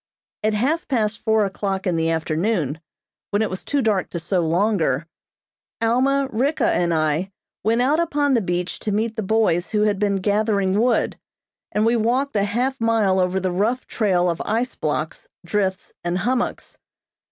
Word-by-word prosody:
At 215 0 +1
half 290 +10 0
past 225 -4 0
four 220 -1 +2
o'clock 195 0 -3
in 180 -3 +1
the 165 0 +1
afternoon, 160 - -1 0.5
when 205 +1 +1
it 215 - -2
was 185 - -4
too 285 -2 0
dark 210 -4 +1
to 170 - -4
sew 175 +3 0
longer, 165 -4 +1 0.7
Alma, 265 +4 +2
Ricka 270 +8 +1
and 175 -1 +2
I 155 +3 0 0.3
went 230 +3 +2
out 295 +5 +2
upon 290 -4 +1
the 235 - +3
beach 175 -1 -2
to 210 - -2
meet 220 +2 -1
the 220 - -2
boys 195 -4 +1
who 210 -1 +1
had 205 -2 +1
been 205 -1 +1
gathering 200 0 +1
wood, 240 +1 +1 0.5
and 210 +1 +1
we 230 +1 +3
walked 250 +5 0
a 200 - +3
half 245 +5 -1
mile 220 -5 +2
over 185 +1 +1
the 185 -1 -1
rough 220 +8 0
trail 185 -5 +1
of 170 -1 -1
ice 235 +4 -1
blocks, - - -3 0.2
drifts 190 -3 -1
and 175 +1 -1
hummocks. 245 +6 -2
210 Hz, 175 wpm, -22 LUFS, 185-230 Hz, 0.7 s, the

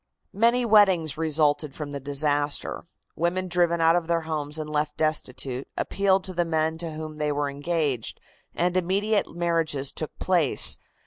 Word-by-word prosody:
Many 235 +4 +3
weddings 190 -8 +4
resulted 150 -2 +1
from 150 -2 -6
the 140 - -4
disaster. 145 +1 0 0.3
Women 180 +2 -1
driven 175 -1 +1
out 165 +1 +5
of 175 -2 -1
their 170 -1 +1
homes 155 -2 -3
and 155 -1 -4
left 150 0 -2
destitute, 135 -4 -2
appealed 195 -1 +1
to 185 - -3
the 175 0 +1
men 160 -1 -1
to 165 -2 -5
whom 155 0 -7
they 150 -1 -1
were 145 -1 -1
engaged, 145 -4 -2 0.4
and 180 +1 0
immediate 195 +2 0
marriages 165 -5 0
took 155 - -5
place. 175 -7 +2
160 Hz, 155 wpm, -25 LUFS, 150-175 Hz, 0.4 s, out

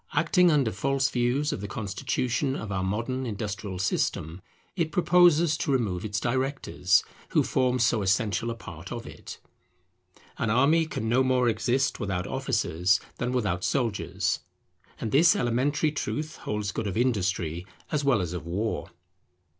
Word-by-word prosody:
Acting 170 +3 +4
under 140 -8 +2
false 135 +6 0
views 125 +5 +1
of - - -5
the 100 - -4
constitution 115 +7 -2
of 105 -5 -5
our 95 -1 -1
modern 115 +7 -2
industrial 100 -3 -4
system, 90 -2 -1 0.3
it 165 -4 -1
proposes 170 -2 +4
to 145 - -1
remove 110 -8 0
its 105 -2 -2
directors, 130 -6 +1 0.3
who - - +3
form 125 0 +1
so 115 -2 +2
essential 100 +3 +1
a 115 - -3
part 115 - -10
of - - -5
it. - - -9 1.0
An 115 - 0
army 150 +8 +3
can 110 -7 -4
no 120 +3 +3
more 130 -1 +2
exist 130 +4 +1
without 95 -5 -2
officers 105 - +1 0.2
than 125 0 -1
without 100 -8 -1
soldiers; 120 -7 0 0.6
and 110 - -3
this 165 +7 +6
elementary 140 - +1
truth 150 +1 -4
holds 105 -1 -3
good 110 0 -3
of 95 - -3
Industry 95 -7 0 0.2
as 150 -2 0
well 135 -7 +3
as 90 -1 -3
of 90 -4 -5
War. 100 +7 -3
120 Hz, 155 wpm, -27 LUFS, 100-135 Hz, 1.0 s, this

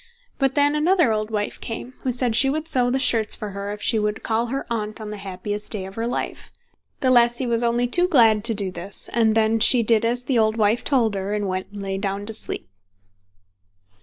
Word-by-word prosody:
But 270 -1 +1
then 290 0 +3
another 315 -3 +2
old 215 0 -2
wife 210 -2 -4
came, 240 +2 -6
who 260 - -2
said 245 -2 0
she 270 +3 +5
would 310 +3 -3
sew 250 -5 +1
the 255 - 0
shirts 230 -5 +2
for 210 -1 -7
her 200 +1 -6
if 210 0 -7
she 225 - +2
would 210 +1 -3
call 230 +1 -1
her 270 +3 -4
Aunt 215 -1 -4
on 215 -1 -7
the 210 - -6
happiest 200 +2 -6
day 200 -4 -3
of 190 - -10
her 230 +3 -3
life. 245 - -5 0.5
The 260 - +3
lassie 240 +1 +3
was 235 -1 0
only 240 +1 +1
too 350 +9 +2
glad 225 - +4
to 230 -2 +6
do 195 -2 0
this, 190 +2 -7
and 220 -2 +2
then 225 0 +2
she 235 +2 +6
did 225 0 +4
as 240 +2 -1
the 250 -2 0
old 220 0 +1
wife 215 +2 +1
told 240 -7 +1
her, 195 +1 -3
and 205 -1 -2
went 185 0 -3
and 205 -1 -8
lay 195 0 -3
down 200 0 -3
to 220 - -3
sleep. 215 - -3
225 Hz, 230 wpm, -22 LUFS, 210-245 Hz, 0.5 s, to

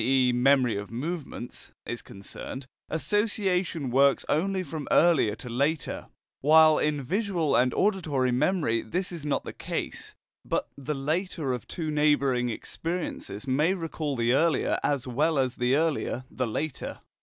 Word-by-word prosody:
e. 130 0 +3
memory 125 -2 +3
of 100 0 -5
movements) 140 0 -5
is 120 - -4
concerned, 100 +6 -8 0.2
association 185 - 0
works 140 +2 +4
only 190 +4 +1
from 155 -5 -6
earlier 145 -11 +4
to 125 - -8
later, 140 +5 -1 0.3
while 155 +2 +6
in 150 -2 0
visual 180 - 0
and 125 +1 +4
auditory 155 -11 +1
memory 130 -3 +1
this 180 +12 -3
is 165 -4 -6
not 145 - 0
the - - -7
case, - - -5 0.3
but - - -1
the 145 +2 -4
later 155 0 -1
of 125 - -5
two 160 -3 -4
neighbouring 140 -5 +2
experiences 140 - -4
may 150 +8 +2
recall 160 -4 -3
the 120 0 +2
earlier 160 +1 +2
as 140 -3 0
well 150 +5 +1
as 130 -2 0
the 125 +1 +2
earlier 155 -4 0
the 130 -1 -2
later. 145 +6 -4
145 Hz, 145 wpm, -27 LUFS, 125-165 Hz, 0.3 s, while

